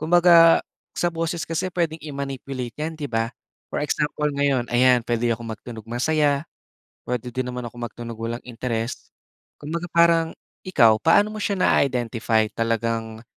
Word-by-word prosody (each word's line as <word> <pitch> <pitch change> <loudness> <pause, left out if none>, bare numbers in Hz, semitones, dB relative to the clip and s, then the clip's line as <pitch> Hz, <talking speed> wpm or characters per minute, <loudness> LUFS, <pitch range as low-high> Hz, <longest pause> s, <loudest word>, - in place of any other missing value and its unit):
Kumbaga, 170 0 +6 0.3
sa 175 - +1
boses 165 0 -2
kasi 170 +3 -1
puwedeng 165 -2 -1
i-manipulate 135 -4 -5
'yan 155 +1 -4
'di 145 -2 -5
ba. 115 +1 -1 0.4
For - - -1
example, 150 0 0
ngayon 135 -4 +1
ayan 125 0 +4
puwede 120 0 -2
akong 115 0 -6
magtunog 110 0 -8
masaya, 145 +4 +1 0.6
puwede 125 0 -3
din 130 0 -3
naman 125 0 -5
akong 120 0 -8
magtunog 115 +1 -8
walang 115 +1 -4
interest. 115 -1 -4 0.4
Kumbaga 170 +4 -5
parang 170 -1 +5 0.4
ikaw, 115 -11 +5
paano 205 +6 +4
mo 215 - -6
siya 205 -1 0
naa-identify, 115 -6 +2
talagang 115 0 -2
130 Hz, 145 wpm, -23 LUFS, 115-160 Hz, 0.6 s, Kumbaga